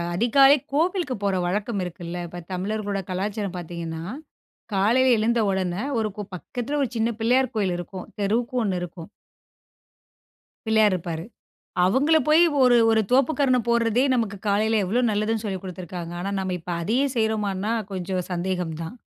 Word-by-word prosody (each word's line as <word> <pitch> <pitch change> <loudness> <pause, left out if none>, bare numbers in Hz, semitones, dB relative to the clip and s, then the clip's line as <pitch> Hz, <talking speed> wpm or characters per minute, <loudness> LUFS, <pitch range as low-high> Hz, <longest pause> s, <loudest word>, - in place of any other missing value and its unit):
அதிகாலை 270 +7 +6 0.2
கோவிலுக்கு 330 -2 +1
போற 200 -1 +1
வழக்கம் 205 +2 -1
இருக்குல்ல, 175 0 -6
இப்போ 175 +1 -8
தமிழர்களோட 200 +2 -2
கலாச்சாரம் 195 +1 -3
பார்த்தீங்கன்னா, 165 -1 -6 0.7
காலையில 240 +6 +4
எழுந்த 230 +2 +1
உடனே, 185 +1 -1 0.2
ஒரு 215 -1 0 0.3
பக்கத்தில 245 +10 -4
ஒரு 260 - -1
சின்ன 225 +1 +1
பிள்ளையார் 255 +3 +2
கோயில் 190 -4 +1
இருக்கும். 180 +1 -7
தெருவுக்கு 235 +6 0
ஒண்ணு 190 -4 0
இருக்கும். 175 -1 -8 1.6
பிள்ளையார் 220 -2 +4
இருப்பாரு. 165 -2 -5 0.6
அவங்களைப் 290 - +3
போய் 310 +2 +6 0.2
ஒரு 250 -1 +6
ஒரு 220 0 +4
தோப்புக்கரணம் 260 -2 +3
போடுறதே, 235 +1 +3
நமக்கு 225 -5 -1
காலையில 215 +2 +2
எவ்வளவு 240 +6 +1
நல்லதுன்னு 215 +1 -1
சொல்லிக்குடுத்திருக்கிறாங்க. 185 -3 -5
ஆனா, 195 +2 -3
நம்ம 190 -1 -2
இப்ப 170 - -8
அதையும் 260 +8 +1
செய்றோமானா 215 -2 0 0.2
கொஞ்சம் 185 -1 -3
சந்தேகம் 180 -2 -2
தான். 165 +9 -7
210 Hz, 135 wpm, -24 LUFS, 185-240 Hz, 1.6 s, அதிகாலை